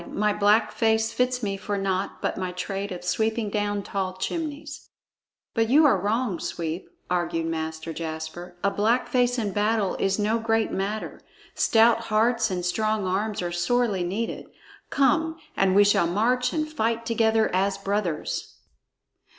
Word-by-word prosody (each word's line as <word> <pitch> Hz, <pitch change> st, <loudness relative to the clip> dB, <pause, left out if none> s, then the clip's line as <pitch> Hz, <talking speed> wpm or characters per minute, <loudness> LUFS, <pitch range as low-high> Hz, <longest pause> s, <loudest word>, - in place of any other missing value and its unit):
"My 210 Hz, 0 st, +1 dB
black 210 Hz, +2 st, +3 dB
face 220 Hz, -1 st, +1 dB
fits 250 Hz, -1 st, 0 dB
me 200 Hz, -1 st, -1 dB
for 205 Hz, +1 st, -3 dB
naught 195 Hz, 0 st, -2 dB
but -, -, 0 dB
my 185 Hz, -1 st, -3 dB
trade 195 Hz, +2 st, -4 dB
of 180 Hz, -1 st, -6 dB
sweeping 220 Hz, +3 st, 0 dB
down 205 Hz, -1 st, -1 dB
tall 190 Hz, -2 st, -3 dB
chimneys." 300 Hz, -, -5 dB, 0.6 s
"But 225 Hz, -1 st, +1 dB
you 300 Hz, +5 st, +6 dB
are 260 Hz, -10 st, +4 dB
wrong, 210 Hz, -2 st, 0 dB
Sweep," 165 Hz, +1 st, -4 dB, 0.2 s
argued 170 Hz, -2 st, -1 dB
Master 160 Hz, 0 st, -4 dB
Jasper; 160 Hz, +2 st, -6 dB
"a 200 Hz, -, +3 dB
black 225 Hz, +5 st, +1 dB
face 245 Hz, 0 st, +2 dB
in 215 Hz, -4 st, -1 dB
battle 210 Hz, 0 st, +1 dB
is 195 Hz, 0 st, +1 dB
no 215 Hz, +2 st, +1 dB
great 225 Hz, 0 st, +1 dB
matter. 205 Hz, +3 st, -3 dB, 0.3 s
Stout 225 Hz, +1 st, +4 dB
hearts 225 Hz, +1 st, +2 dB
and 180 Hz, -2 st, -3 dB
strong 215 Hz, +2 st, 0 dB
arms 200 Hz, +2 st, -1 dB
are 175 Hz, -, -2 dB
sorely 195 Hz, +2 st, +1 dB
needed. 200 Hz, +6 st, -3 dB, 0.4 s
Come, 320 Hz, +4 st, +2 dB, 0.2 s
and 190 Hz, -1 st, +2 dB
we 205 Hz, -, +7 dB
shall 200 Hz, -4 st, +3 dB
march 245 Hz, +7 st, +1 dB
and 310 Hz, -1 st, -1 dB
fight 230 Hz, -6 st, -1 dB
together 225 Hz, -1 st, +2 dB
as 195 Hz, +1 st, +1 dB
brothers." 195 Hz, -6 st, -2 dB
210 Hz, 155 wpm, -25 LUFS, 185-230 Hz, 0.6 s, we